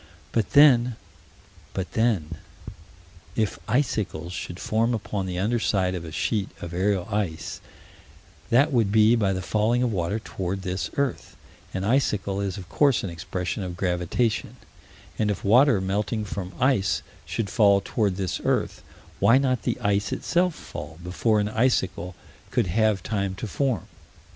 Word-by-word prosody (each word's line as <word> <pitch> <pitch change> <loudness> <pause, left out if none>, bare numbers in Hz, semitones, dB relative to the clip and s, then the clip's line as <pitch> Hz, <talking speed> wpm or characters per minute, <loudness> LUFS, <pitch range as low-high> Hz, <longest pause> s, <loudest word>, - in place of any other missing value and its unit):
But 115 -3 -1
then 125 -5 +6 0.8
but 95 -1 -3
then 95 -9 0 1.0
if 110 -6 -1
icicles 105 - -1
should 90 0 -6
form 115 +2 +1
upon 100 -2 -3
the 90 -1 -4
under 110 +6 +1
side 95 -4 +1
of 90 -2 -4
a 80 - -8
sheet 100 +6 -1
of 85 0 -7
aerial 95 0 0
ice, 100 -6 -3 0.9
that 140 +5 +4
would 115 -5 +2
be 110 +2 +5
by 105 -4 +2
the 95 -1 -2
falling 110 +5 +1
of 125 - +1
water 90 +2 -1
toward 95 -3 -4
this 95 -3 -2
earth; 140 -3 -2 0.4
an 95 - -3
icicle 100 -4 +1
is 100 -1 -3
of 95 - -8
course 140 -4 +2
an 95 - -3
expression 90 +3 -4
of 90 -2 -5
gravitation 90 +5 -1 0.6
and, 105 - +2
if 100 - -2
water 125 +2 +5
melting 105 +3 -1
from 95 -2 -5
ice 100 - +2 0.2
should 110 -4 -3
fall 100 -3 +5
toward 100 -1 -1
this 95 -2 -3
earth, - - 0 0.4
why 115 - +6
not 130 -4 +1
the - - -2
ice 100 -2 +1
itself 180 -1 +1
fall 80 - -8
before 105 +5 +1
an 105 0 0
icicle 95 -7 0 0.3
could - - +1
have 105 +1 +1
time 100 -3 -2
to 105 - -5
form? 115 - -1
100 Hz, 155 wpm, -25 LUFS, 95-115 Hz, 1.0 s, then